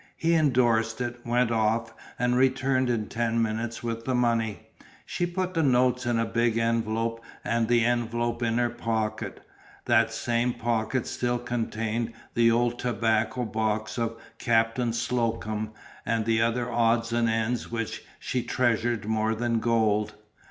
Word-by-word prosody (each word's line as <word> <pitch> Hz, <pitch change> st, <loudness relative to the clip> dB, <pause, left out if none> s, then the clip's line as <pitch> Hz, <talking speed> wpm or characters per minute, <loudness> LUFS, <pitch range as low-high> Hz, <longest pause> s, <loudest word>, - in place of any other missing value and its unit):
He 165 Hz, +1 st, +2 dB
endorsed 120 Hz, -7 st, +2 dB
it, 120 Hz, 0 st, -3 dB
went 120 Hz, 0 st, +1 dB
off 115 Hz, +1 st, +1 dB, 0.2 s
and 125 Hz, 0 st, +1 dB
returned 130 Hz, 0 st, +2 dB
in 115 Hz, -3 st, 0 dB
ten 115 Hz, 0 st, -1 dB
minutes 115 Hz, +1 st, -2 dB
with 115 Hz, -1 st, -3 dB
the 130 Hz, -, 0 dB
money. 115 Hz, -5 st, 0 dB, 0.4 s
She 175 Hz, -, -1 dB
put 185 Hz, +1 st, -2 dB
the 165 Hz, -, +1 dB
notes 125 Hz, -2 st, +2 dB
in 120 Hz, -1 st, +1 dB
a 115 Hz, -, +1 dB
big 115 Hz, 0 st, +1 dB
envelope 115 Hz, 0 st, 0 dB, 0.2 s
and 115 Hz, -1 st, 0 dB
the 120 Hz, -1 st, +3 dB
envelope 120 Hz, 0 st, 0 dB
in 115 Hz, -1 st, +1 dB
her 120 Hz, -1 st, +1 dB
pocket. 110 Hz, -2 st, -3 dB, 0.4 s
That -, -, +3 dB
same 120 Hz, +1 st, 0 dB
pocket 115 Hz, +1 st, -1 dB
still 120 Hz, 0 st, -1 dB
contained 115 Hz, -1 st, -2 dB, 0.2 s
the 115 Hz, 0 st, +4 dB
old 120 Hz, +1 st, +1 dB
tobacco 115 Hz, 0 st, 0 dB
box 110 Hz, +1 st, -2 dB
of 115 Hz, 0 st, -2 dB, 0.2 s
Captain 115 Hz, 0 st, +2 dB
Slocum 115 Hz, -2 st, -1 dB, 0.3 s
and 115 Hz, 0 st, 0 dB
the 115 Hz, 0 st, +2 dB
other 115 Hz, +1 st, +1 dB
odds 115 Hz, 0 st, +2 dB
and 120 Hz, -1 st, +2 dB
ends 115 Hz, +2 st, -1 dB
which 115 Hz, -1 st, -4 dB
she 125 Hz, -, -2 dB
treasured 120 Hz, -2 st, 0 dB
more 110 Hz, +1 st, 0 dB
than 115 Hz, 0 st, 0 dB
gold. 110 Hz, -2 st, +1 dB
115 Hz, 150 wpm, -27 LUFS, 115-120 Hz, 0.4 s, the